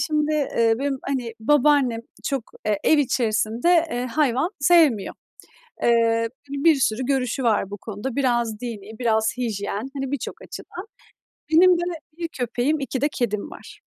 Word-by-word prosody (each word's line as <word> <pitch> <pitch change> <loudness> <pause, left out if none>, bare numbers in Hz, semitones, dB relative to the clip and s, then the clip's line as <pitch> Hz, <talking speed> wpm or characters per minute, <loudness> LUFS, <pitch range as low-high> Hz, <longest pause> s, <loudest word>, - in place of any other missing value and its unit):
şimdi, 305 -1 0
eee, 235 -6 +2
benim, 275 -1 -1
hani, 255 -4 -3
babaannem 275 -2 +3 0.2
çok 275 -4 -1 0.3
e 210 - +3
ev 310 - +5
içerisinde, 235 -1 0 0.2
eee, 245 +1 -2
hayvan 275 +4 +1
sevmiyor. 290 - +4 0.7
Eee, 230 -1 +3 0.2
bir 285 +4 +3
sürü 260 -3 0
görüşü 265 -1 0
var 215 -4 +1
bu 205 - -5
konuda. 220 +5 -6
Biraz 240 -5 0
dinî, 220 -3 -7
biraz 220 -2 +1
hijyen, 215 0 -3
hani, 270 -1 -4
birçok 285 - -5
açıdan. 365 +4 -9 0.7
Benim 355 +2 +6
de - - -2 0.4
1 335 -1 -3
köpeğim, 255 +2 -1
2 270 -1 -3
de 290 - +2
kedim 210 -4 -2
var. - - -12
250 Hz, 145 wpm, -23 LUFS, 225-285 Hz, 0.7 s, Benim